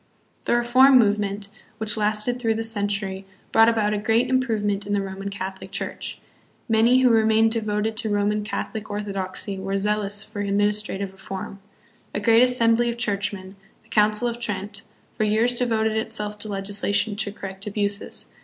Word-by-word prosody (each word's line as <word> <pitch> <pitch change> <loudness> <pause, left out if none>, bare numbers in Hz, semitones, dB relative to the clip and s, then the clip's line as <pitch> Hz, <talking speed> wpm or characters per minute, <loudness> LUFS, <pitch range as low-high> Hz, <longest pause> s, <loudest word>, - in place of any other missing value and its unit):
The - - +2
reform 255 +3 +6
movement, 205 -2 +1 0.3
which 220 -2 0
lasted 215 +3 0
through 225 -2 +1
the 225 - -2
century, 205 -3 -2 0.3
brought 225 +1 +6
about 215 -2 +1
a 210 - -1
great 225 +4 +2
improvement 210 -6 0
in 205 - -1
the 200 - +1
Roman 195 +1 -5
Catholic 190 -1 -6
Church. - - -5 0.5
Many, 235 +3 +4
who 250 -2 +5
remained 220 0 +4
devoted 215 -1 -1
to 225 -1 -1
Roman 205 +1 +1
Catholic 215 0 -5
orthodoxy, 200 -1 -4
were 195 +1 -2
zealous 205 0 -1
for 215 -1 -5
administra 205 +1 +1
tive 195 -1 -4
reform. 195 +1 -7 0.6
A - - +1
great 225 +2 +5
assembly 240 -1 +4
of 235 - -4
Churchmen, 200 -4 -3 0.3
the 220 - -27
Council 210 +2 +3
of 235 0 -4
Trent, 205 -2 -3 0.3
for - - 0
years 220 +3 +2
devoted 225 -3 0
itself 215 -2 -3
to 215 - -5
legislation 200 +1 0
to 210 -1 -1
correct 195 0 -8
abuses. 205 0 -3
210 Hz, 165 wpm, -24 LUFS, 200-225 Hz, 0.6 s, reform